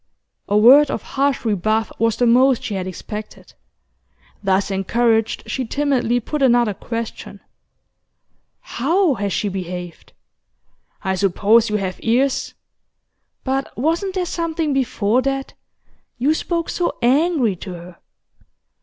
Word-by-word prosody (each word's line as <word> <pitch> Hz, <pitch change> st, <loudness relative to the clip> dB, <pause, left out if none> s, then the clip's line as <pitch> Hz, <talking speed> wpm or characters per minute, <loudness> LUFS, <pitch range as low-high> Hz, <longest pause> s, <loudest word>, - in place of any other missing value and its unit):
A 205 Hz, -, +3 dB
word 265 Hz, +7 st, +7 dB
of -, -, -3 dB
harsh 275 Hz, -2 st, -1 dB
rebuff 215 Hz, +1 st, 0 dB
was 230 Hz, -1 st, +1 dB
the 245 Hz, -, +2 dB
most 250 Hz, +2 st, +4 dB
she 210 Hz, -, -4 dB
had 185 Hz, -1 st, -3 dB
expected. 210 Hz, +3 st, -8 dB, 0.9 s
Thus 195 Hz, 0 st, +1 dB
encouraged, 225 Hz, +3 st, +1 dB
she 265 Hz, -, -3 dB
timidly 250 Hz, -2 st, 0 dB
put 295 Hz, +5 st, -4 dB
another 240 Hz, -4 st, +3 dB
question. 230 Hz, +3 st, -6 dB, 1.2 s
'How 330 Hz, +6 st, +1 dB
has 205 Hz, -4 st, -3 dB
she 175 Hz, +5 st, -1 dB
behaved?' 180 Hz, -2 st, -6 dB, 0.9 s
'I 190 Hz, -1 st, 0 dB
suppose 205 Hz, +4 st, +3 dB
you 210 Hz, -, -1 dB
have 190 Hz, -3 st, -3 dB
ears?' 255 Hz, +4 st, 0 dB, 0.9 s
'But 270 Hz, +1 st, -3 dB
wasn't 335 Hz, -, -1 dB
there 365 Hz, -1 st, 0 dB
something 330 Hz, -3 st, -2 dB
before 245 Hz, -3 st, +1 dB
that? 270 Hz, 0 st, -3 dB, 0.6 s
You 275 Hz, +6 st, +2 dB
spoke 335 Hz, +1 st, -2 dB
so 350 Hz, -, -2 dB
angry 270 Hz, -, +2 dB
to 185 Hz, -, -8 dB
her. 175 Hz, 0 st, -11 dB
235 Hz, 125 wpm, -20 LUFS, 205-275 Hz, 1.2 s, word